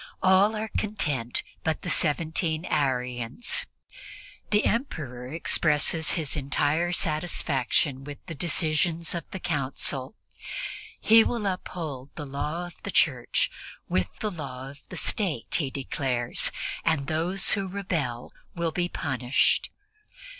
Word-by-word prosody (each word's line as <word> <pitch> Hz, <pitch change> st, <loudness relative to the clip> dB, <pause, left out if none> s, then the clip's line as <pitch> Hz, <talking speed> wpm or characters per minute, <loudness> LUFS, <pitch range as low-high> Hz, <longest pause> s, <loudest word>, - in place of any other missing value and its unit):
All 190 Hz, +3 st, +5 dB
are 215 Hz, 0 st, -3 dB
content 145 Hz, -, -1 dB, 0.2 s
but 160 Hz, -1 st, -1 dB
the -, -, -2 dB
seventeen 160 Hz, +1 st, +1 dB
Arians. 125 Hz, -, 0 dB, 0.8 s
The 210 Hz, 0 st, +3 dB
Emperor 140 Hz, -, -1 dB
expresses 160 Hz, 0 st, +2 dB
his 155 Hz, -5 st, 0 dB
entire 145 Hz, +4 st, +1 dB
satisfaction 150 Hz, -5 st, 0 dB
with 145 Hz, 0 st, -7 dB
the 170 Hz, -, -6 dB
decisions 160 Hz, +1 st, +1 dB
of 170 Hz, -3 st, -4 dB
the 190 Hz, -, -5 dB
Council; 140 Hz, -1 st, 0 dB, 0.8 s
he 225 Hz, +1 st, +7 dB
will 230 Hz, -2 st, -1 dB
uphold 160 Hz, -8 st, -4 dB
the 150 Hz, -, -5 dB
law 150 Hz, +5 st, -3 dB
of 175 Hz, -, -12 dB
the -, -, -5 dB
Church 130 Hz, -10 st, +3 dB, 0.4 s
with 90 Hz, -1 st, +1 dB
the 215 Hz, -, 0 dB
law 135 Hz, -5 st, -6 dB
of 140 Hz, -, -15 dB
the 185 Hz, -, -6 dB
State, 165 Hz, -, -1 dB
he 145 Hz, -5 st, +2 dB
declares, 130 Hz, -3 st, -1 dB, 0.3 s
and 160 Hz, -4 st, +2 dB
those 170 Hz, +5 st, +2 dB
who 195 Hz, -2 st, +1 dB
rebel 170 Hz, -11 st, -3 dB, 0.2 s
will 170 Hz, -1 st, 0 dB
be 175 Hz, +2 st, 0 dB
punished. 130 Hz, -5 st, +2 dB
155 Hz, 125 wpm, -27 LUFS, 135-180 Hz, 0.8 s, he